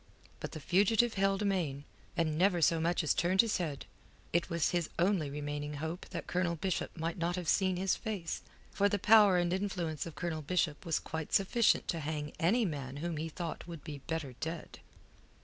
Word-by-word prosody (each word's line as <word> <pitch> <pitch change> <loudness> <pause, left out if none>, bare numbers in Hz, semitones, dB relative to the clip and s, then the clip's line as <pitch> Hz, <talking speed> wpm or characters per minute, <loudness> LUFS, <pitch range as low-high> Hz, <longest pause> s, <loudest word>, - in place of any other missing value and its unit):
But - - -6
the 155 - -5
fugitive 210 +8 +3
held 195 +1 +1
amain, 170 -9 0 0.3
and 160 -3 +1
never 180 +2 +3
so 165 0 +4
much 170 +1 +1
as 155 - +3
turned 185 +2 +4
his 230 -2 0
head. 155 -7 -3 0.5
It 170 +1 +1
was 170 -2 +1
his 175 -3 0
only 175 -4 +2
remaining 145 +1 -4
hope 160 +4 -5
that 170 -3 -5
Colonel 175 -1 0
Bishop 180 +2 -2
might 165 +2 -3
not 170 +1 0
have 180 -3 -4
seen 185 +1 +3
his 190 +1 +1
face; 205 -7 -4 0.3
for 200 0 +2
the 205 - +1
power 205 -2 +6
and 175 0 +1
influence 180 -5 -2
of 165 - -9
Colonel 170 -3 -3
Bishop 155 0 -1
was 165 - +2
quite 160 -1 -5
sufficient 215 +4 +3
to 170 - 0
hang 150 -1 -4
any 220 +8 +3
man 140 -5 -4
whom 165 +1 -3
he 160 +2 -3
thought 165 +1 -5
would 165 -4 -8
be 145 -2 -6
better 160 -5 -3
dead. 160 0 -5
170 Hz, 195 wpm, -33 LUFS, 155-190 Hz, 0.5 s, power